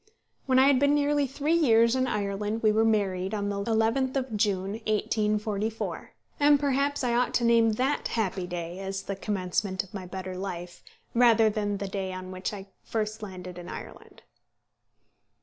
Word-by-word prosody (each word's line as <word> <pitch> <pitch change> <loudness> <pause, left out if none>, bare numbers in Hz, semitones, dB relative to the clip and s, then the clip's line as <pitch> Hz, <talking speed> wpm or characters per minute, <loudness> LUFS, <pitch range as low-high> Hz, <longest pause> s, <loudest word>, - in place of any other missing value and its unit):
When 260 -1 +3
I 260 - +7
had 275 -2 +5
been 285 +1 +4
nearly 290 -1 +2
three 290 +4 -1
years 235 -7 +4
in 260 0 +1
Ireland 210 +1 -2
we 215 - +5
were 220 +1 +3
married 200 -3 +1
on 205 -1 -2
the 200 0 -2
11th 230 +4 +1
of 260 -4 -2
June, 195 -2 0 0.2
1844; 215 0 -1 0.3
and 290 0 +5
perhaps 280 0 0
I 245 -1 +1
ought 245 +1 +1
to 240 - +2
name 230 -1 +4
that 265 +6 0
happy 190 -5 -2
day 175 0 -5
as 195 0 -4
the 200 - -4
commencement 190 -1 -2
of 195 - -18
my 190 -3 -6
better 185 0 -6
life, 175 -2 -6 0.3
rather 230 -2 +5
than 205 -1 -1
the 200 0 -4
day 190 -1 -3
on 185 0 -7
which 185 0 -4
I 200 -2 -7 0.2
first 215 0 -3
landed 185 -3 -8
in 175 0 -9
Ireland. - - -10
215 Hz, 175 wpm, -27 LUFS, 195-240 Hz, 0.3 s, I